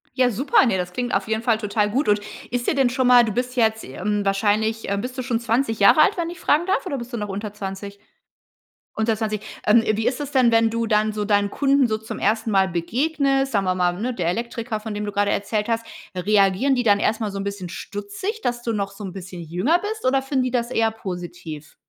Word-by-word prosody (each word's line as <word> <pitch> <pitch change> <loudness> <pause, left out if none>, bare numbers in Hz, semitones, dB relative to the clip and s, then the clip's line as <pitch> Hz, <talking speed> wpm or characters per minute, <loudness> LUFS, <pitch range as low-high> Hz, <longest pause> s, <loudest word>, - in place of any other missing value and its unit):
Ja, 255 -1 +3
super. 265 +5 +3
Ne, 220 -6 +1
das 180 -1 -3
klingt 245 +2 -3
auf 195 +1 0
jeden 220 +1 -1
Fall 230 -2 +2
total 210 -1 0
gut. 265 +8 0
Und 205 0 +4 0.3
ist 245 0 -2
dir - - +2
denn 270 -3 +3
schon 255 0 0
mal 245 -1 +7
du 220 - -1
bist 250 +3 -2
jetzt, 220 -2 +2
ähm, 205 +9 -2
wahrscheinlich, 215 +3 0
äh, 200 - 0
bist 250 +5 -5
du - - -1
schon 240 -2 -1
20 230 0 0
Jahre 200 +9 +6
alt, 400 - +4
wenn 340 -1 -1
ich 350 +1 -9
fragen 310 +1 +2
darf, 390 +2 0
oder 285 -7 -3
bist 240 0 -8
du - - -2
noch 210 -1 -4
unter 205 +1 -5
20? 200 0 -6 1.0
Unter 220 0 +1
20. 215 -1 -2 0.2
Ähm, 225 +2 +5
wie 220 +1 -1
ist 255 - 0
es 290 -1 -5
denn, 255 -4 +4
wenn 225 0 +4
du 230 +1 -1
dann 215 0 +2
so 210 0 -2
deinen 205 -1 +2
Kunden 275 +1 +2
so 215 - -1
zum 220 0 -7
ersten 220 +2 0
Mal 195 -1 +4
begegnest, 270 - 0
sagen 200 -2 +1
wir 185 0 +1
mal, 180 -1 +1
ne, 250 +4 -2
der 180 -7 -2
Elektriker, 230 +2 -3
von 215 0 -6
dem 210 0 -3
du 205 - -3
gerade 205 0 +1
erzählt 210 +2 -1
hast. 230 0 0 0.3
Reagieren 200 +7 +3
die 245 - 0
dann 205 -3 +4
erstmal 215 0 0
so 195 - -6
'n - - -3
bisschen 200 -3 -5
stutzig, 215 - -5
dass 240 - -2
du 230 - -1
noch 200 -2 -2
so 200 +1 -10
'n 185 - -7
bisschen 185 -2 -8
jünger 180 - +1
bist, 435 +3 -5
oder 265 +1 +3
finden 270 -1 0
die 255 - -2
das 240 -1 -1
eher 225 -2 +2
positiv? 175 -7 -8
220 Hz, 245 wpm, -22 LUFS, 200-250 Hz, 1.0 s, mal